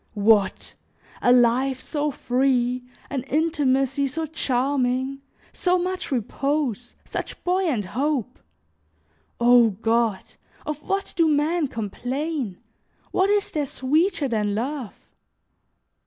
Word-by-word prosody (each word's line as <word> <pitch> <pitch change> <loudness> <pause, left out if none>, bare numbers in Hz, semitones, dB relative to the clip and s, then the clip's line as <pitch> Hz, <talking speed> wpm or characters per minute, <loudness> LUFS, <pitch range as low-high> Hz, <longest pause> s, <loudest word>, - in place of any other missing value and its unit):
What! 205 -1 +2 0.5
a 245 - +4
life 250 +2 +3
so 300 +1 -2
free, 250 -1 +1 0.3
an 270 -2 -1
intimacy 275 -3 +1
so 320 +5 -2
charming, 265 -2 0 0.3
so 360 0 +2
much 365 -1 -3
repose, 255 0 -1
such - - -6
buoyant 355 - +1
hope! 260 - -2 1.0
O 240 -1 +6
God! 225 0 0 0.4
Of 300 -1 -4
what 395 +3 -2
do 330 -2 +3
men 305 +2 +1
complain? 250 - -3 0.5
What 380 +1 +2
is 410 -1 +1
there 295 -3 -1
sweeter 305 +5 +1
than 210 -4 0
love? 255 0 -3
270 Hz, 105 wpm, -24 LUFS, 240-305 Hz, 1.0 s, O